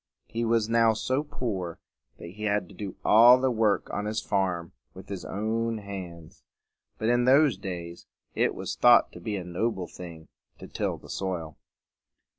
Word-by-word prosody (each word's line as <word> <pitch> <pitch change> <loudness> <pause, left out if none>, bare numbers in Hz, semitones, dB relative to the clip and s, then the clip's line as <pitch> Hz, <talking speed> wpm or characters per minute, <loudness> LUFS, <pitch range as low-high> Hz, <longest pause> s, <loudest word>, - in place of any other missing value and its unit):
He 115 +1 -3
was 115 -1 +2
now 115 -1 +4
so 130 +5 -1
poor 100 - -4 0.4
that 85 - -9
he 105 +3 -6
had 105 -3 0
to - - -13
do 100 -3 -6
all 120 +4 +8
the 130 0 +1
work 110 -4 +1
on 100 - -3
his 110 +1 -1
farm 90 -4 -1 0.2
with 95 +1 -12
his 100 -2 -5
own 115 +2 -2
hands. 95 -6 -9 0.6
But 110 - -1
in 120 0 +3
those 135 -1 +5
days 90 -3 -7 0.3
it - - +1
was - - -4
thought - - +5
to - - -11
be 110 -2 -4
a 95 - -4
noble 90 +2 -2
thing 85 -3 -11 0.3
to - - -10
till - - -2
the - - -15
soil. 85 -5 -4
105 Hz, 175 wpm, -27 LUFS, 90-115 Hz, 0.6 s, all